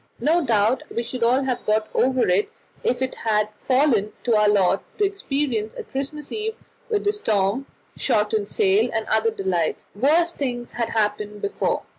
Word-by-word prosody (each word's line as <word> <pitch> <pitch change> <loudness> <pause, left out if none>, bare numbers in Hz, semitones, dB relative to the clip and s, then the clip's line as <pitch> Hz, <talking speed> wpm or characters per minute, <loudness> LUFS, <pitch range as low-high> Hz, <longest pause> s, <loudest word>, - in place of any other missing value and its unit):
No 320 +7 +2
doubt 230 0 +2
we 235 - -2
should 245 +1 -6
all 250 +4 +3
have 255 -2 -2
got 215 0 +1
over 260 -1 +2
it 185 +3 +2 0.3
if 250 +1 +1
it 260 - -2
had 215 -2 0 0.2
fallen 255 -6 +3
to 235 -2 +2
our 210 -1 +4
lot 195 -2 +3 0.2
to 420 - +1
experience 275 - -2
a - - -6
Christmas 280 +2 -5
Eve 440 0 -2 0.3
with 425 -3 0
storm, 220 - 0 0.3
shortened 210 -1 0
sail, 205 +5 +3
and 220 -1 0
other 220 +1 +3
delights; 190 -6 -1
worse 315 +10 +3
things 245 -6 -4
had 235 -1 -2
happened 210 -1 -1
before. 405 - -1
230 Hz, 165 wpm, -23 LUFS, 210-275 Hz, 0.3 s, our